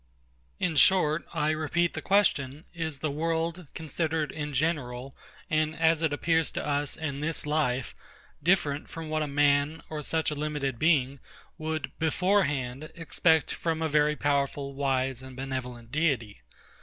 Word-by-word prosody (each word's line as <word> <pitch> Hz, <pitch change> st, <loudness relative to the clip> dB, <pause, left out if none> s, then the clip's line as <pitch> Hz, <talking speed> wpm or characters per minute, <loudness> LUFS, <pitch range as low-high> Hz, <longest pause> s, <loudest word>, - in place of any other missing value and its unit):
In 170 Hz, -4 st, 0 dB
short, 155 Hz, 0 st, +5 dB
I 155 Hz, -2 st, +1 dB
repeat 160 Hz, +2 st, 0 dB
the -, -, -4 dB
question: 155 Hz, -8 st, +2 dB
Is 160 Hz, -4 st, -3 dB
the 150 Hz, -, 0 dB
world, 165 Hz, +2 st, -1 dB
considered 160 Hz, 0 st, -1 dB
in 150 Hz, -1 st, -4 dB
general, 135 Hz, -3 st, -1 dB, 0.3 s
and 155 Hz, 0 st, +1 dB
as 160 Hz, 0 st, +3 dB
it 160 Hz, -2 st, +1 dB
appears 160 Hz, +2 st, +1 dB
to -, -, -3 dB
us 145 Hz, -1 st, -1 dB
in 145 Hz, -3 st, -3 dB
this 155 Hz, +1 st, -2 dB
life, 145 Hz, -5 st, 0 dB, 0.5 s
different 150 Hz, -4 st, +1 dB
from 165 Hz, -2 st, -7 dB
what 155 Hz, 0 st, 0 dB
a 150 Hz, -, 0 dB
man, 145 Hz, +2 st, +2 dB
or 155 Hz, -1 st, -3 dB
such 160 Hz, +1 st, 0 dB
a -, -, -1 dB
limited 145 Hz, -4 st, -2 dB
being, 140 Hz, -4 st, +3 dB, 0.4 s
would, 155 Hz, 0 st, -3 dB
beforehand, 155 Hz, -6 st, +1 dB
expect 160 Hz, -1 st, +2 dB
from 160 Hz, -1 st, -1 dB
a -, -, +2 dB
very 150 Hz, 0 st, +3 dB
powerful, 140 Hz, -1 st, 0 dB
wise, 135 Hz, -2 st, 0 dB
and 130 Hz, -1 st, -10 dB
benevolent 125 Hz, -3 st, -5 dB
Deity? 135 Hz, -, 0 dB
150 Hz, 150 wpm, -28 LUFS, 140-160 Hz, 0.5 s, short